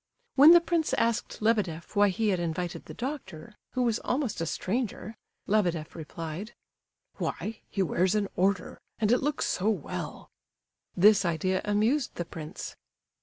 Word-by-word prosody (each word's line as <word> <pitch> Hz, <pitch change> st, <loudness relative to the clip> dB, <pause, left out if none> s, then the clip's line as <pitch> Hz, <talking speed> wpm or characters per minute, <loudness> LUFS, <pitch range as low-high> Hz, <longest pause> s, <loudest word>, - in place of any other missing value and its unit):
When 285 Hz, +3 st, +8 dB
the 345 Hz, -, +8 dB
prince 335 Hz, -2 st, 0 dB
asked 230 Hz, -2 st, -1 dB
Lebedeff 200 Hz, -6 st, 0 dB
why 205 Hz, 0 st, +5 dB
he 215 Hz, +3 st, 0 dB
had 185 Hz, -3 st, +1 dB
invited 175 Hz, +1 st, -3 dB
the -, -, -9 dB
doctor, 235 Hz, -, -6 dB, 0.2 s
who 255 Hz, -, +1 dB
was 235 Hz, -2 st, +1 dB
almost 250 Hz, -, -1 dB
a 165 Hz, -, -1 dB
stranger, 220 Hz, +4 st, -3 dB, 0.3 s
Lebedeff 175 Hz, -7 st, 0 dB
replied: 165 Hz, +6 st, -7 dB, 0.6 s
"Why, 215 Hz, 0 st, -3 dB
he 195 Hz, -, 0 dB
wears 185 Hz, +3 st, +1 dB
an 205 Hz, -1 st, +1 dB
'order,' 190 Hz, 0 st, 0 dB, 0.2 s
and 215 Hz, -1 st, +1 dB
it 245 Hz, -, +4 dB
looks 295 Hz, +1 st, 0 dB
so 195 Hz, +4 st, 0 dB
well!" 195 Hz, -10 st, -4 dB, 0.7 s
This 205 Hz, +2 st, +6 dB
idea 180 Hz, +2 st, 0 dB
amused 220 Hz, +7 st, +1 dB
the 175 Hz, -, -3 dB
prince. 160 Hz, +3 st, -7 dB
205 Hz, 150 wpm, -28 LUFS, 175-230 Hz, 0.7 s, When